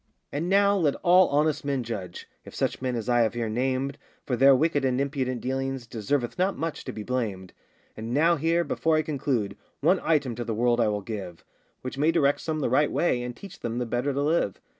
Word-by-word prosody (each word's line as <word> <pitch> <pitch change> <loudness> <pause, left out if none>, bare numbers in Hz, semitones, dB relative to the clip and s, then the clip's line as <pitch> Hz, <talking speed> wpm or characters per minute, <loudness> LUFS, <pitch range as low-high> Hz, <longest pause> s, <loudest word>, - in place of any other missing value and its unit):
And 160 +5 -2
now 200 +1 +4
let 160 -8 +2
all 180 +1 +6
honest 150 +1 +1
men 140 -3 -1
judge, 100 -7 -6 0.2
If - - -12
such - - -1
men 130 -1 -1
as 115 -1 -4
I 120 -1 +3
have 115 0 +1
here 115 -2 -2
named 130 +4 -1 0.3
For 125 - 0
their 135 +2 +6
wicked 145 0 +1
and 130 -1 +1
impudent 135 -3 -2
dealings, 135 -1 -3
Deserveth 120 - -2
not 190 +2 +1
much 165 -1 -4
to 130 - -4
be 110 - -6
blamed. 105 -7 -3 0.4
And 110 +1 -6
now 165 +6 +4
here, 165 +3 +1
before 160 -1 0
I 155 - +1
conclude, 130 -9 -1 0.2
One 175 +6 +3
item 145 -6 +1
to 120 - -4
the 115 -2 -3
world 120 +1 +2
I 115 - +3
will 105 -1 -1
give, 95 -6 -7 0.4
Which 130 +1 -5
may 155 +3 +4
direct 145 -4 +2
some 155 -1 -2
the - - +1
right 145 +3 +3
way, 125 -8 +1
And 125 0 -5
teach 195 +5 -11
them 115 0 -4
the 125 - -1
better 120 +4 -1
to 140 +1 -1
live. 150 - 0
135 Hz, 225 wpm, -26 LUFS, 120-155 Hz, 0.4 s, all